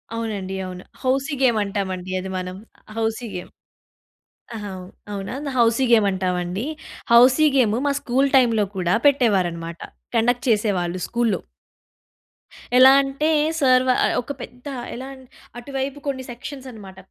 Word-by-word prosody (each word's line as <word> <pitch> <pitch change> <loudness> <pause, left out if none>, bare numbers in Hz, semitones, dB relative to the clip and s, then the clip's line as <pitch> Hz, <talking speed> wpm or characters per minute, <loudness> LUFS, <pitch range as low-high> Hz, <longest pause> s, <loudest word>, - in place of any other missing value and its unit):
అవునండి. 205 -4 -4
అవును. 180 0 -8 0.2
Housie 270 +2 0
game 240 -4 +4
అంటామండి 190 -2 -4
అది 190 +1 -6
మనం. 185 0 -5 0.4
Housie 225 +1 -1
game. 180 - -7 1.1
ఆహా! 205 -2 -6 0.4
అవునా! 195 +4 -5 0.2
హౌసీ 235 +2 +3
గేమ్ 215 -3 +5
అంటామండి. 185 +1 -2 0.5
హౌసీ 255 +6 +7
గేమ్ 225 -5 +3
మా 285 - +2
స్కూలు 265 +3 +1
టైంలో 230 -5 +4
కూడా 180 0 +1
పెట్టేవారన్నమాట. 180 -11 +1 0.4
కండక్ట్ 245 +2 +2
చేసేవాళ్ళు 190 -5 0
స్కూల్లో. 235 -6 0 1.4
ఎలా 260 +1 +9
అంటే! 275 +3 -1 0.3
సారు 255 -2 +4
వాళ్ళు 255 - +2
ఒక 265 - -7
పెద్ద 250 +3 -10 0.3
ఎలా 260 +2 -7 0.5
అటువైపు 270 +2 -4
కొన్ని 260 -2 -2
సెక్షన్స్ 265 +2 -8
అన్నమాట. 195 -4 -12
230 Hz, 125 wpm, -22 LUFS, 190-255 Hz, 1.4 s, ఎలా